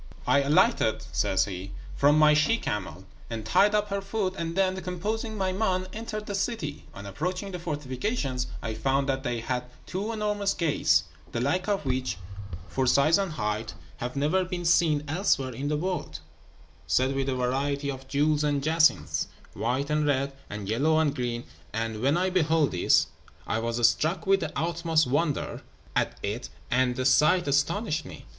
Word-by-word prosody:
"I 135 +3 +4
alighted," 140 +2 +3
says 95 0 +2
he, 95 0 -6 0.2
"from 145 +2 +4
my 155 0 +6
she 150 +10 +3
camel, 95 - -4 0.2
and 115 -2 -5
tied 205 - +4
up 210 0 +1
her 200 0 -1
foot; 195 -2 -2
and 170 -2 -3
then, 190 -1 +1
composing 210 +5 -3
my 190 -1 0
mind, 185 -2 0
entered 215 -1 -5
the 205 - -4
city. 195 -8 -3
On 100 - -8
approaching 180 - -3
the 180 - -5
fortifications, 145 - -2 0.2
I 110 - -2
found 135 +5 0
that 135 -1 0
they 120 -3 -2
had 125 +1 -2 0.2
two 200 +4 -3
enormous 210 -2 0
gates, 165 -4 +2 0.3
the 115 - -2
like 145 - 0
of 200 -7 0
which, 130 -1 -1 0.5
for 130 -1 -1
size 145 +8 +4
and 195 -5 -2
height, 105 -3 -3 0.2
have 125 +2 -4
never 155 +7 +2
been 180 -1 -4
seen 160 -3 +3
elsewhere 145 -6 +1
in 135 +5 -4
the 150 0 0
world, 175 - -3 0.7
set 130 +1 +2
with 135 0 -1
a 130 - 0
variety 140 +3 -1
of 135 0 -9
jewels 150 +2 +2
and 145 -2 0
jacinths, 160 +1 +2 0.3
white 130 +5 -1
and 150 0 +2
red, 140 -1 +1 0.2
and 105 -2 -6
yellow 145 +9 +2
and 155 -3 +2
green; 120 -2 -2 0.3
and 110 -1 -2
when 140 +6 +3
I 185 +1 +1
beheld 160 -4 +2
this, 90 - +3 0.4
I 110 - -1
was 115 +1 +3
struck 160 +8 0
with 195 0 +4
the 160 -4 -3
utmost 165 0 +1
wonder 145 +3 -1 0.3
at - - 0
it, 115 +4 -3 0.2
and 125 0 +2
the 130 - -2
sight 155 +6 +4
astonished 155 +4 +1
me. - - -11
150 Hz, 175 wpm, -27 LUFS, 130-180 Hz, 0.7 s, my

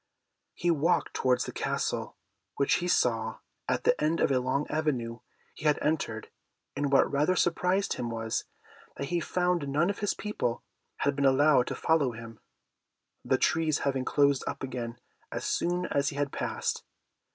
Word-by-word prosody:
He 175 - +1
walked 165 +2 +1
towards 130 -1 +1
the - - -5
Castle, - - -2 0.4
which 140 - +2
he 175 - -1
saw 115 -8 +1 0.3
at - - 0
the - - +2
end 160 +2 +1
of - - +2
a 130 - +3
long 130 +3 0
avenue 130 -7 -1 0.3
he - - -10
had 150 -1 +4
entered, 115 -8 -2 0.4
and 145 -1 -1
what 140 - +4
rather 150 +6 +2
surprised 180 +3 +1
him 120 - -3
was, 115 -1 -2 0.5
that 140 - -4
he 175 - +1
found 180 -2 0
none 155 +7 +2
of 205 - -8
his 205 - 0
people 210 - -2 0.4
had 140 - +2
been 140 0 +3
able 140 0 +5
to - - -4
follow 150 -6 +2
him, 115 -1 -10 0.8
the - - +2
trees 160 -2 +2
having 135 -2 0
closed 140 0 +2
up - - -4
again 120 -2 -4 0.3
as - - -4
soon 175 +1 0
as 140 0 +2
he 140 - -8
had 145 -1 -1
passed. - - -2
140 Hz, 170 wpm, -29 LUFS, 125-165 Hz, 0.8 s, able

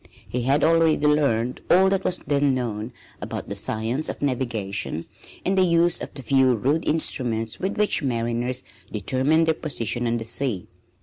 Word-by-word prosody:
He 125 - -2
had 135 +4 +2
already 165 -1 +4
learned 135 -5 +1
all 190 +2 +6
that 195 -1 +1
was 180 - +1
then 140 -1 +2
known 115 -2 -3 0.3
about - - -5
the - - -4
science 115 +7 -2
of - - -5
navigation 115 - -2 0.4
and 190 - +2
the 190 - +4
use 170 -1 +3
of - - -6
the 135 - -8
few 130 +1 +3
rude 140 +9 0
instruments 120 -8 0
with 190 +2 -2
which 210 0 +2
mariners 120 0 -1 0.3
determined 130 - +2
their 160 - +3
position 120 -6 -3
on 115 0 +1
the 115 - -5
sea. 115 -5 -1
130 Hz, 170 wpm, -24 LUFS, 115-155 Hz, 0.4 s, all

